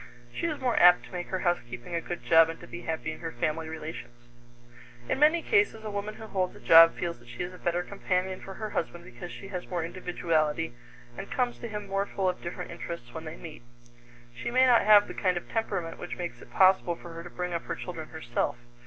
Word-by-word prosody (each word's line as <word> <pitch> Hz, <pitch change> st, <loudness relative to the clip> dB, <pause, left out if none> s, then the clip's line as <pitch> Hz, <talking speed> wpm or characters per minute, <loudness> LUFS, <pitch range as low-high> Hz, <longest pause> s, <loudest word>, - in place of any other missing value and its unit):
She 340 Hz, -, -1 dB
is 305 Hz, -3 st, -3 dB
more 250 Hz, -3 st, +1 dB
apt 180 Hz, 0 st, +7 dB
to -, -, -15 dB
make 180 Hz, -1 st, -4 dB
her 185 Hz, -1 st, -2 dB
housekeeping 125 Hz, -4 st, -2 dB
a 170 Hz, -, 0 dB
good 175 Hz, +1 st, -6 dB
job 165 Hz, -1 st, +7 dB
and 165 Hz, -, -6 dB
to -, -, -9 dB
be 115 Hz, -1 st, -8 dB
happy 160 Hz, +3 st, -3 dB
in 155 Hz, -, -8 dB
her 165 Hz, -1 st, -4 dB
family 155 Hz, +6 st, -2 dB
relations. 155 Hz, -6 st, -7 dB, 0.9 s
In -, -, 0 dB
many 310 Hz, +3 st, +5 dB
cases 415 Hz, -, +2 dB
a 215 Hz, -, -4 dB
woman 205 Hz, +1 st, -4 dB
who 220 Hz, -, -9 dB
holds 185 Hz, -4 st, -1 dB
a -, -, -12 dB
job 165 Hz, 0 st, +8 dB
feels 170 Hz, -6 st, -3 dB
that 120 Hz, -, -19 dB
she 120 Hz, +8 st, -5 dB
is 180 Hz, +1 st, -6 dB
a 180 Hz, -, -12 dB
better 175 Hz, +1 st, 0 dB
companion 185 Hz, -1 st, -2 dB
for 195 Hz, -, -8 dB
her 215 Hz, 0 st, -5 dB
husband 170 Hz, +1 st, -3 dB
because 120 Hz, +8 st, -9 dB
she 195 Hz, -, -9 dB
has 180 Hz, -3 st, -5 dB
more 175 Hz, -2 st, -1 dB
individuality 165 Hz, -4 st, -1 dB, 0.4 s
and 195 Hz, -, -7 dB
comes 245 Hz, -2 st, -1 dB
to 235 Hz, -, -5 dB
him 210 Hz, -2 st, -5 dB
more 195 Hz, +1 st, -1 dB
full 195 Hz, -2 st, -1 dB
of 180 Hz, -, -1 dB
different 175 Hz, -, -6 dB
interests 170 Hz, -7 st, -7 dB
when 160 Hz, 0 st, -7 dB
they 155 Hz, +1 st, -7 dB
meet. 155 Hz, -6 st, -10 dB, 0.7 s
She 120 Hz, -, -4 dB
may 255 Hz, +2 st, +5 dB
not 245 Hz, -2 st, +6 dB
have 210 Hz, -1 st, +7 dB
the -, -, -6 dB
kind 185 Hz, -3 st, +1 dB
of 175 Hz, -, -6 dB
temperament 195 Hz, -7 st, -2 dB
which 175 Hz, -, -6 dB
makes 175 Hz, -1 st, -5 dB
it -, -, -13 dB
possible 185 Hz, -2 st, +4 dB
for 170 Hz, 0 st, -11 dB
her 165 Hz, 0 st, -7 dB
to 175 Hz, -, -9 dB
bring 180 Hz, 0 st, -4 dB
up 170 Hz, -, -3 dB
her 170 Hz, -, -3 dB
children 160 Hz, -2 st, -7 dB
herself. 120 Hz, -5 st, -2 dB
175 Hz, 240 wpm, -28 LUFS, 165-195 Hz, 0.9 s, job